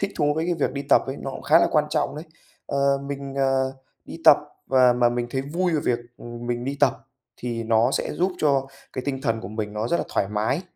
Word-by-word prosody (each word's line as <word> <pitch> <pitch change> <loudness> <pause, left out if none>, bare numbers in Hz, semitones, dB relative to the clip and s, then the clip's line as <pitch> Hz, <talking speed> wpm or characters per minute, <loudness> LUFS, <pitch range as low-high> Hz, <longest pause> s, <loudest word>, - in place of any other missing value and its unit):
thích 200 0 -1
thú 145 -2 +2
với 160 +1 -1
cái 175 - +1
việc 150 -5 -1
đi 140 - -3
tập - - +6
ấy 135 +1 -4
nó 135 - -5
cũng - - -8
khá 160 +2 +5
là - - +4
quan 150 -1 +3
trọng 150 - -1
đấy. 155 - -6 0.4
Ờ, 140 0 +1
mình, 140 -1 -5
ờ, 135 -1 +1 0.3
đi - - -9
tập 150 -2 +9 0.3
và 130 -2 +5
mà 120 0 +3
mình 120 0 -2
thấy 130 +1 -1
vui 170 +6 -1
về 155 - +1
việc, 120 - +1 0.2
ừm, 120 0 -8
mình 120 0 -2
đi 140 +2 -3
tập 145 - +4 0.4
thì 120 -1 -4
nó 115 +2 +3
sẽ - - -1
giúp 180 +2 0
cho 140 -3 +2 0.3
cái 130 - -4
tinh 135 -2 -2
thần 115 -4 0
của 95 - -7
mình 105 -1 -4
nó 105 +2 -2
rất 170 - +2
là - - -2
thoải 100 - 0
mái. 110 - -1
135 Hz, 255 wpm, -24 LUFS, 120-145 Hz, 0.4 s, tập